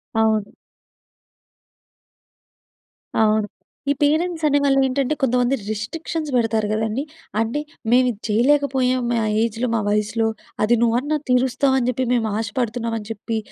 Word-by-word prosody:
అవును. 220 -2 +2 2.7
అవును. 215 -1 +3 0.4
ఈ 285 - +4
పేరెంట్సనేవాళ్ళేంటంటే, 285 -4 +2
కొంతమంది 250 0 +2
రిస్ట్రిక్షన్స్ 300 +9 -4
పెడతారు 225 -3 +1
గదండి. 220 +4 -1 0.4
అంటే, 225 +6 0 0.3
మేవిది 245 -3 +3
చెయ్యలేకపోయాం, 255 +2 +2
మా 235 - +1 0.3
ఏజ్‌లో, 230 +2 -1
మా 220 - +1
వయసులో 210 +2 +1 0.4
అది 235 +3 +4
నువ్వన్నా 250 +6 +1
తీరుస్తావని 260 0 +2
జెప్పి 255 +1 -1
మేమాశపడుతున్నామని 225 0 -2
చెప్పి, 225 +1 -4
245 Hz, 95 wpm, -21 LUFS, 220-270 Hz, 2.7 s, ఈ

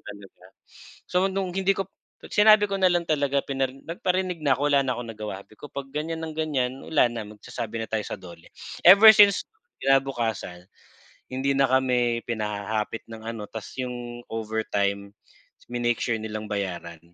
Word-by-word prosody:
talaga. 100 -3 -12 0.6
So, 180 +1 +2
no'ng 190 -1 -2
hindi 195 +1 +1
ko 195 - -1
p 190 - -29 0.3
at - - -12
sinabi 215 0 +6
ko 195 -1 -2
na 185 - +6
lang 175 -1 +1
talaga 140 -3 0
pinari 135 -1 -3
nagparinig 180 +1 -2
na 140 -4 +2
'ko, 145 - 0
wala 140 - +5
na 130 -3 -1
akong 115 -2 -6
nagawa, 105 -2 -7
sabi 110 - -22
ko, 145 - -9
"Pag 135 -1 -7
ganyan 160 +2 -3
ng 160 - -6
ganyan, 150 -5 -1
wala 160 - +2
na 115 - -4
magsasabi 105 +1 -7
na - - -2
tayo 110 - 0
sa - - -5
DOLE." 85 -3 -13 0.3
Ever 200 +5 +10
since 205 -2 +6 0.4
kinabukasan, 120 -9 0 0.6
hindi 135 +1 -1
na 135 - +5
kami 125 -2 +1
pinahahapit 105 -1 -3
ng 115 - -8
ano, 115 -3 -6
'tas 110 -2 -8
'yong 120 -1 -6
overtime, 105 -3 -2 0.6
minake 120 -1 -1
sure 115 -2 -1
nilang 110 0 -5
bayaran. 90 -5 -4
125 Hz, 170 wpm, -25 LUFS, 110-160 Hz, 0.6 s, Ever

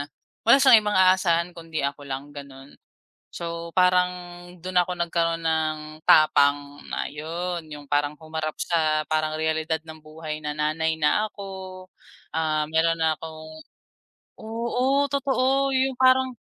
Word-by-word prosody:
na 145 - -6 0.3
wala 235 +4 +6
siyang 260 -5 +7
ibang 210 -2 -1
aasahan 185 -2 +3
kundi 165 -3 -5
ako 140 0 -4
lang 135 +2 -6
gano'n. 140 -1 -11 0.6
So 170 0 -6
parang 180 0 +4 0.5
dun 185 0 0
ako 180 0 +1
nagkaroon 165 -1 -1
ng 160 -1 0 0.3
tapang 145 -1 +4
na - - -4
yun, 170 +3 -5
yung 150 -2 -10
parang 145 0 +1
humarap 155 0 -5
sa 155 -2 +1
parang 155 0 0
realidad 160 0 -1
ng 160 0 -11
buhay 155 0 -7
na 150 -1 -5
nanay 155 +2 0
na 160 +7 +1
ako. 190 -2 -9 0.5
Ah, 155 -1 -1
meron 165 +1 +2
na 160 -1 +1
akong, 155 -1 -10 0.7
oo, 245 +5 0
totoo 275 0 +1
yung 260 0 +1
parang, 260 0 +4
160 Hz, 140 wpm, -24 LUFS, 155-185 Hz, 0.7 s, siyang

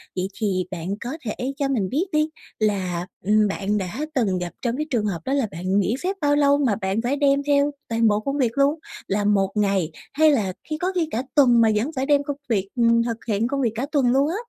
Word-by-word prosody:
Vậy 185 +1 -1
thì 190 -4 0
bạn 170 -1 -5
có 260 +7 -4
thể 250 +5 -3
cho 280 -2 0
mình 220 -9 0
biết 305 +9 0
đi 305 +1 +2 0.3
là, 185 -4 -1 0.2
ừm, 210 +1 +4
bạn 200 +1 -1
đã 190 +6 -4 0.2
từng 200 -8 +1
gặp 175 -1 -3
trong 240 +1 -1
cái 305 - -1
trường 230 -5 0
hợp 185 -5 -2
đó 270 - -1
là 275 -5 +1
bạn 185 +4 0
nghỉ 210 +5 +1
phép 385 +2 -1
bao 290 0 +3
lâu 285 -1 +4
mà 260 -8 +1
bạn 190 +4 0
phải 250 +4 0
đem 280 -1 +2
theo 285 0 +3 0.2
toàn 230 0 +2
bộ 210 -1 +3
công 275 +6 -3
việc 245 -3 0
luôn? 285 +3 +3 0.3
Là 205 +1 0
một 195 -2 +2
ngày 195 -6 +1 0.2
hay 310 +1 +5
là 200 -9 0 0.2
khi 310 - -2
có 365 +3 -1
khi 335 -3 +1
cả 245 - -1
tuần 245 -5 +6
mà 225 - +5
vẫn 230 +9 0
phải 260 +1 -1
đem 285 -1 +3
công 285 0 -4
việc, 195 -3 0
ừm, 230 -1 +3
thực 230 -1 -2
hiện 220 +1 +1
công 275 +1 -1
việc 235 -4 +1
cả 240 +4 -2
tuần 265 -5 +3
luôn 275 +3 +3
á? 345 - -2
235 Hz, 255 wpm, -23 LUFS, 200-280 Hz, 0.3 s, tuần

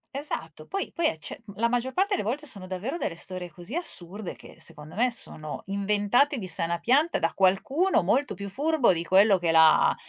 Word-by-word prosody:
Esatto, 165 - -4
poi 390 - -4
poi 335 - -2
e 160 - -3
cioè, - - -7 0.2
la 235 +1 +2
maggior 245 +2 -1
parte 395 +2 +1
le - - -2
volte 280 +8 -3
sono 200 -8 -3
davvero 190 - -4
delle 175 - -3
storie 180 0 -3
così 180 - -8
assurde 205 - -2
che - - -14
secondo 150 +3 -7
me 245 +3 +2
sono 155 -9 -4
inventate 205 +8 +1
di 190 - -6
sana 170 -1 0
pianta 285 - +2
da 165 - 0
qualcuno 265 - +2
molto 250 +8 +1
più 200 +1 -7
furbo 290 +3 +2
di 170 -2 0
quello 195 +3 +5
che 170 -2 0
l'ha 160 -1 +5
205 Hz, 195 wpm, -26 LUFS, 175-275 Hz, 0.2 s, quello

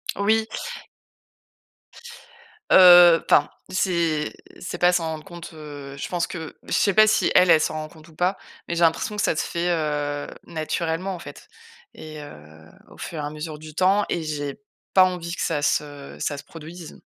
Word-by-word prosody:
Oui. 220 +2 +1 2.2
Heu, 175 -2 +8
enfin, 145 - +4 0.2
c'est 170 -5 0 0.3
c'est 175 - -6
pas 180 0 +4
s'en 175 -2 0
rendre 155 -1 -7
compte, 175 -3 -10
heu, 145 -3 -9
je - - -5
pense 175 -2 -1
que 160 -3 -7
je - - -6
sais 200 - +2
pas 215 +2 +6
si 215 - +2
elle, 180 - +6
elle 155 - +6
s'en 155 - -1
rend 155 0 -4
compte 155 +1 -17
ou 160 - -19
pas, 180 +3 0 0.3
mais 170 - -3
j'ai 170 - -2
l'impression 165 +5 +1
que 210 - -1
ça - - +1
se - - 0
fait, 170 +1 -2
heu, 145 -3 -2 0.2
naturellement 165 +3 -3
en 175 - -9
fait 145 -2 -12 0.5
et 155 -1 -10
heu, 80 - -14 0.2
au - - -16
fur 160 - -6
et 145 - -3
à - - -3
mesure 155 0 -7
du 155 0 -11
temps 190 +4 +3
et 170 - -2
j'ai 145 +1 -4 0.3
pas 185 -1 +7
envie 175 -2 -4
que - - -6
ça 150 -4 -1
se 145 -1 -2
ça 145 - -2
se 145 - -9
produise. 165 +2 -11
160 Hz, 190 wpm, -23 LUFS, 150-180 Hz, 2.2 s, Heu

